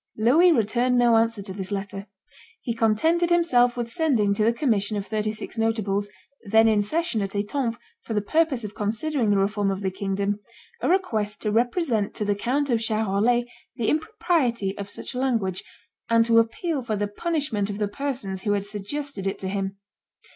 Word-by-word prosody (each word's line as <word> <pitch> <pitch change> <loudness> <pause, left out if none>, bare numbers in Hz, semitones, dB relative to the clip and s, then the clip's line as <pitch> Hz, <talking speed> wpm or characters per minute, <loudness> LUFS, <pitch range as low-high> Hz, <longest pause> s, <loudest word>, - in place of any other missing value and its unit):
Louis 290 +12 +5
returned 245 -1 +2
no 240 -1 +5
answer 225 -2 +1
to 190 -1 -5
this 190 0 -6
letter. 200 0 -4 0.5
He 235 - -3
contented 275 +11 +2
him 345 0 +4
self 245 -6 +3
with 240 -1 -2
sending 235 - +1
to 210 - 0
the 225 - +4
commission 220 -5 0
of 200 - -3
thirty 215 0 -1
six 215 +1 -7
notables, 205 -3 0 0.4
then 220 +2 +6
in 215 -2 +4
session 270 +1 -1
at 195 0 -4
Etampes 230 +3 -1 0.2
for 225 - -5
the 210 - +2
purpose 275 +2 +1
of 210 -1 -6
considering 225 +4 -1
the 205 - +3
reform 200 +1 +1
of 195 0 -2
the 190 -1 -1
kingdom, 200 +1 -2 0.4
a - - 0
request 225 - 0
to 210 - 0
represent 235 - 0
to 210 - -2
the 205 - +2
Count 260 +7 -1
of 230 -2 +2
Charolais 220 +2 +1 0.3
the 225 - 0
impropriety 260 - 0
of 200 0 -6
such 205 - -6
language, 230 -8 -1 0.5
and 230 0 +4
to 230 0 +5
appeal 275 +7 -1
for 225 -3 -2
the 205 0 -1
punishment 250 -4 -2
of 200 - -4
the 210 -1 0
persons 210 -6 -3
who 205 0 0
had 200 -1 0
suggested 205 +2 -4
it 195 - -2
to 190 - -3
him. 195 0 -3
220 Hz, 190 wpm, -25 LUFS, 205-250 Hz, 0.5 s, then